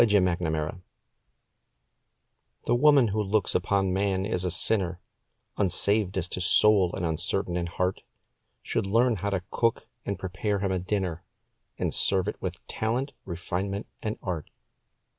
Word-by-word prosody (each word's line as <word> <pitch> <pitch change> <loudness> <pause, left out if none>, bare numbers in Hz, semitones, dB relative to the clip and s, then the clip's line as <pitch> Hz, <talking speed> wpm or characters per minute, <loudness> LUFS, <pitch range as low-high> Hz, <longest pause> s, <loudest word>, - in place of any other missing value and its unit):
THE - - +4
CUSINE 90 -5 +1 1.8
The - - +2
woman 135 -1 +5
who 105 +2 0
looks 105 0 +1
upon 95 0 +1
man 95 0 0
as 90 -3 -1
a 90 - 0
sinner 90 0 +1 0.6
Unsaved 100 +1 +1
as 90 -2 -1
to 90 - -3
soul, 95 0 +5
and 85 - -2
uncertain 85 +3 -1
in 85 -1 -1
heart, 90 +2 -1 0.6
Should - - -1
learn 115 +3 +3
how 100 +3 -2
to 95 -3 -1
cook, 115 -1 +1 0.2
and 100 - -3
prepare 95 +3 -2
him 95 -1 -1
a 95 - 0
dinner, 95 -3 -2 0.5
And - - -1
serve 95 -2 +2
it - - -4
with - - -5
talent, 120 +6 -2
refinement, 95 +3 -3 0.2
and 110 0 -3
art. 85 -5 -3
95 Hz, 145 wpm, -27 LUFS, 90-105 Hz, 1.8 s, woman